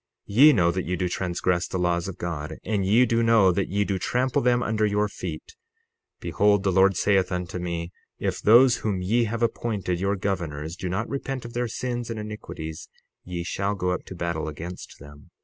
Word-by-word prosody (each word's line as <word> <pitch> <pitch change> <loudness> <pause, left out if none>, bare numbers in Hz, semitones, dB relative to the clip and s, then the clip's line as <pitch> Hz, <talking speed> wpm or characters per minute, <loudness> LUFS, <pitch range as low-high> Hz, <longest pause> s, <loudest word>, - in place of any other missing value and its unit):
60:33 100 - -8
Ye 150 +3 +9
know 85 -7 +3
that 90 +1 -3
ye 90 - -1
do 90 +1 -1
transgress 90 0 -1
the - - -3
laws 85 -1 0
of 95 - -6
God, 80 -4 -5
and 105 -3 -1
ye 110 +7 +4
do 115 -1 +1
know 115 -5 +5
that 95 +2 -1
ye 100 +2 +1
do 100 -2 -2
trample 125 +6 0
them 120 0 +2
under 110 0 0
your 105 0 +2
feet. 455 - -7 0.7
Behold, 100 -1 +2
the 95 - +2
Lord 95 +1 +4
saith 95 -2 +2
unto 90 0 -3
me: 85 -1 -4 0.3
If - - -2
those 120 +3 +6
whom 105 -5 -2
ye 115 +5 +2
have 115 +2 -2
appointed 105 -6 -1
your 100 +2 0
governors 85 -5 -3
do 90 +1 -4
not 105 +6 -2
repent 135 -2 -4
of 120 - -8
their 120 0 -1
sins 120 +1 -4
and 115 -1 -4
iniquities, 95 -7 -7 0.3
ye 90 -1 -5
shall 100 +3 -2
go 90 -2 -1
up 90 - -3
to 95 - -9
battle 85 -2 -3
against 80 +4 -8
them. 70 0 -14
95 Hz, 205 wpm, -25 LUFS, 90-110 Hz, 0.7 s, Ye